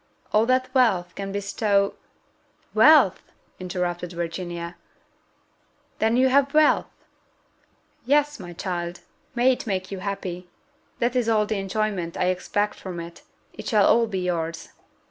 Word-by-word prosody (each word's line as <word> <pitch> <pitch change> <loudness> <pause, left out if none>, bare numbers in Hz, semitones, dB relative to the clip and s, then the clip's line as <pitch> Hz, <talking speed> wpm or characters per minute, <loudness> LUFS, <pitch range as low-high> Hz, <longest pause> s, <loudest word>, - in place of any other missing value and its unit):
All 215 +2 +4
that 255 0 +1
wealth 195 -10 +2
can 195 0 -5
bestow 200 0 0 0.4
" - - -39
"Wealth!" - - +6 0.4
interrupted 180 -1 -3
Virginia: 170 0 -5 1.2
"then 225 +2 +2
you 260 +1 +4
have 275 +2 +2
wealth?" 310 -1 +4 1.2
"Yes, 295 0 +2
my 175 -2 -8
child 175 0 -4 0.3
may 245 +2 +4
it 250 - -3
make 185 -2 -2
you 195 - -4
happy! 185 -2 -5 0.5
that 240 +1 0
is 240 -2 +1
all 215 -2 +3
the 210 -1 -2
enjoyment 195 -3 -2
I 180 - +1
expect 205 +3 -2
from 180 -3 -6
it: 170 0 -9 0.3
it - - -9
shall 210 -4 +4
all 230 0 +4
be 190 -4 -3
yours." 165 -2 -3
195 Hz, 140 wpm, -24 LUFS, 175-230 Hz, 1.2 s, Wealth